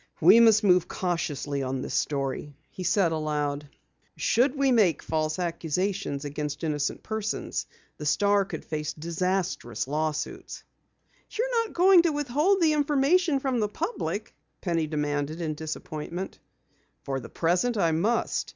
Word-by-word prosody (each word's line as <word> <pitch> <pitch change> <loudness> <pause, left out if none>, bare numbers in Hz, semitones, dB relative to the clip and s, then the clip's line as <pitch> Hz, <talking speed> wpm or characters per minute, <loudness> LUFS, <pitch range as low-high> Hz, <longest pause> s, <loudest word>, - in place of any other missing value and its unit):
"We 230 - +7
must 225 -1 +6
move 180 -3 +4
cautiously 150 -5 -2
on 130 0 -2
this - - -5
story," 140 0 -2 0.2
he 185 - -7
said 180 -2 +2
aloud. 150 -2 -2 0.5
"Should 255 +4 +2
we 275 -1 +3
make 205 - +3
false 155 -1 -1
accusations 175 -2 -2
against 145 +2 -4
innocent 150 -2 -1
persons, 220 -1 -3 0.3
the 150 - -7
Star 200 +4 +3
would - - -6
face 150 -1 -3
disastrous 170 - -2
lawsuits." 155 +1 -3 0.7
"You're 470 0 0
not - - -15
going 365 0 +7
to 335 -2 +1
withhold 295 +7 +1
the 315 -2 +4
information 295 +2 +2
from 265 -3 -1
the 210 -1 0
public?" 335 - -3 0.3
Penny 165 -4 -1
demanded 150 +1 -2
in 160 -2 -2
disappointment. 155 +3 -6 0.6
"For 135 -1 -2
the - - -10
present, 180 +8 +1
I 170 -5 +3
must. 205 +9 0
175 Hz, 140 wpm, -27 LUFS, 150-235 Hz, 0.7 s, We